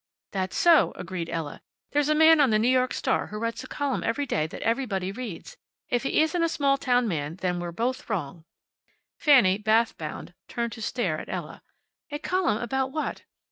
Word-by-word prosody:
"That's 190 -2 -2
so," 335 -4 +5
agreed 180 -2 -5
Ella. 160 -3 -4 0.3
"There's 295 0 +1
a 305 - +3
man 320 0 +7
on 275 - +4
the 215 - +3
New 220 +3 +2
York 255 0 +2
Star - - 0
who 210 - -7
writes 230 +1 -3
a - - -9
column 285 -2 -2
every 255 +5 -1
day 155 - 0
that - - -8
everybody 215 -6 -1
reads. 245 - -7 0.3
If 245 - +1
he 275 - +2
isn't 320 +2 0
a 335 - +2
small 275 -3 +1
town 245 -2 +2
man 155 -4 -3
then 180 -1 -2
we're 175 0 -4
both 250 - -3
wrong." 165 -6 -3 0.8
Fanny, 230 - +5
bathward 220 +2 +2
bound, 155 +2 -6
turned 235 -1 -3
to 225 - -9
stare 205 -8 -1
at - - -9
Ella. - - -6 0.5
"A 295 - -3
column 360 - 0
about 265 +2 -1
what?" 305 +2 -4
230 Hz, 195 wpm, -26 LUFS, 185-275 Hz, 0.8 s, man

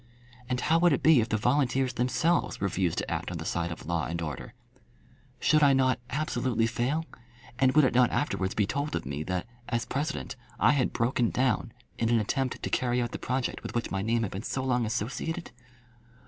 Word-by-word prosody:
And 125 -1 0
how 160 +2 +3
would 175 -2 +5
it - - -1
be 155 -6 +6
if 110 - -2
the 110 - +1
volunteers 130 +2 +1
themselves 125 +8 +1
refused 95 -3 0
to - - -2
act - - -2
on - - -4
the - - -6
side 85 0 -1
of 85 - -8
law 85 -1 -1
and 85 +1 -3
order? 75 - -6 0.8
Should 155 0 +3
I 140 -2 +6
not 130 -1 +2
absolutely 125 -5 0
fail; 125 +8 -1 0.5
and 130 -1 +4
would 155 - +7
it - - +1
not 125 0 +5
afterwards 95 -10 -1
be 105 - +2
told 145 +7 -2
of - - -3
me 70 +2 -4
that, 90 +2 -2 0.2
as 120 -1 -1
President, 150 -1 -3 0.2
I 115 - +5
had 140 -3 +1
broken 120 0 +1
down 125 -2 0 0.3
in 115 - +1
an 120 -1 +4
attempt 130 +4 -2
to - - -1
carry 125 -1 +1
out 120 -1 -1
the - - -5
project 130 0 -2
with - - -7
which 120 - -1
my 95 - -1
name 115 +2 +1
had 100 - -3
been 95 - -4
so 130 +2 -3
long 125 -3 +1
associated? 125 +9 -3
125 Hz, 210 wpm, -28 LUFS, 110-135 Hz, 0.8 s, would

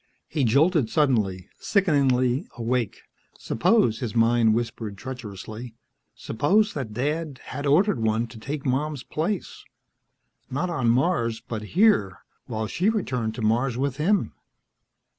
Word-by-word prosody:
He 150 -3 -1
jolted 140 +2 +3
suddenly, 110 - +1
sickeningly 135 -7 +2
awake. 120 -2 -2 0.3
Suppose, 115 - +2
his 120 -3 -4
mind 115 -1 +4
whispered 115 -3 -3
treacherously, 115 -1 -8 0.4
suppose 205 - +1
that 130 -7 -4
Dad 150 +2 -2
had 145 +2 -5
ordered 155 - +3
one 110 +1 +1
to 110 -1 -11
take 140 +4 -5
Mom's 140 +1 -1
place... 175 +5 -3 0.9
not 175 +7 -2
on 130 -8 +1
Mars, 115 -3 +1
but 110 -2 -6 0.2
here 185 - +4 0.3
while 110 -2 -3
she 180 - +1
returned 125 - -1
to 115 - -5
Mars 120 +3 +1
with 135 0 -1
him. 190 +7 +1
125 Hz, 125 wpm, -25 LUFS, 115-150 Hz, 0.9 s, mind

